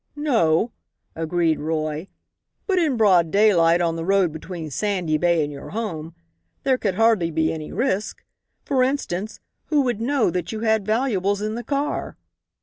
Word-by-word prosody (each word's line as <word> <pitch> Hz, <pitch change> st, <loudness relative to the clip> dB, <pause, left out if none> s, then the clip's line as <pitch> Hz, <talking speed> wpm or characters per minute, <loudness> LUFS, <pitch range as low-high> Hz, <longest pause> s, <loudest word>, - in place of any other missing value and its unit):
"No," 230 Hz, -, +2 dB, 0.4 s
agreed 165 Hz, 0 st, 0 dB
Roy; 155 Hz, +2 st, -2 dB, 0.6 s
"but 380 Hz, -3 st, +1 dB
in 300 Hz, -7 st, +1 dB
broad 185 Hz, -7 st, +4 dB
daylight, 175 Hz, -4 st, +4 dB
on 165 Hz, -1 st, 0 dB
the 165 Hz, -, -3 dB
road 190 Hz, -1 st, +2 dB
between 160 Hz, 0 st, -7 dB
Sandy 180 Hz, -3 st, -1 dB
Bay 170 Hz, -2 st, +2 dB
and 145 Hz, -, -4 dB
your 140 Hz, -, -9 dB
home, 170 Hz, -7 st, -5 dB, 0.5 s
there 260 Hz, -2 st, +2 dB
could 195 Hz, -4 st, -1 dB
hardly 220 Hz, -5 st, +3 dB
be 160 Hz, 0 st, 0 dB
any 155 Hz, -1 st, -6 dB
risk. 215 Hz, -5 st, -2 dB, 0.4 s
For 270 Hz, -3 st, +1 dB
instance, 225 Hz, -7 st, -2 dB, 0.3 s
who 300 Hz, -2 st, +2 dB
would 245 Hz, -5 st, -1 dB
know 255 Hz, -5 st, +1 dB
that 180 Hz, 0 st, -3 dB
you 220 Hz, -1 st, -5 dB
had 220 Hz, -2 st, +1 dB
valuables 210 Hz, -4 st, 0 dB
in 215 Hz, 0 st, -2 dB
the 240 Hz, +2 st, -5 dB
car?" 285 Hz, +2 st, -2 dB
195 Hz, 160 wpm, -23 LUFS, 165-230 Hz, 0.6 s, broad